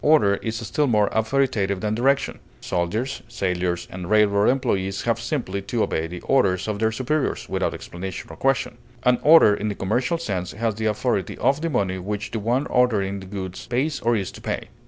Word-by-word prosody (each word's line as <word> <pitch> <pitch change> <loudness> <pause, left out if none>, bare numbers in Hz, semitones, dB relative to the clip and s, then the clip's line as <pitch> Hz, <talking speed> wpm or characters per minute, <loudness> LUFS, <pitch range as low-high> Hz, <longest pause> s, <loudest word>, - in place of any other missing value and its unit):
Order 105 -10 +4
is 115 0 -3
still 150 +7 +1
more 105 -4 +3
authoritative 110 -4 +1
than 105 0 0
direction; 135 +5 +1 0.2
soldiers, 105 +10 -2
sailors, 90 -6 -2
and 90 -1 -6
railroad 105 -1 +4
employees 100 -7 0
have 115 -1 +1
simply 120 -6 -2
to 110 +3 -1
obey 80 +1 -1
the 90 +1 -7
orders 100 -8 +2
of 105 -1 -2
their 110 0 +2
superiors, 135 +5 -1
without - - -1
explanation 95 +1 -7
or - - -9
question; 135 +2 0 0.2
an 125 -1 +4
order 155 -9 +7
in 105 +1 -2
the 105 - -2
commercial 120 - 0
sense 95 - -3
has 115 0 -1
the 110 +1 -2
authority 105 -3 -1
of 140 +3 +2
the 165 - -1
money 95 -9 0
which 105 +3 -4
the 115 - -2
one 120 +6 0
ordering 100 -6 +1
the 95 - -10
goods 95 -2 -6
pays 135 +5 0
or 120 +1 +2
is 95 -4 -2
to - - -12
pay. - - -4
110 Hz, 195 wpm, -23 LUFS, 95-125 Hz, 0.2 s, order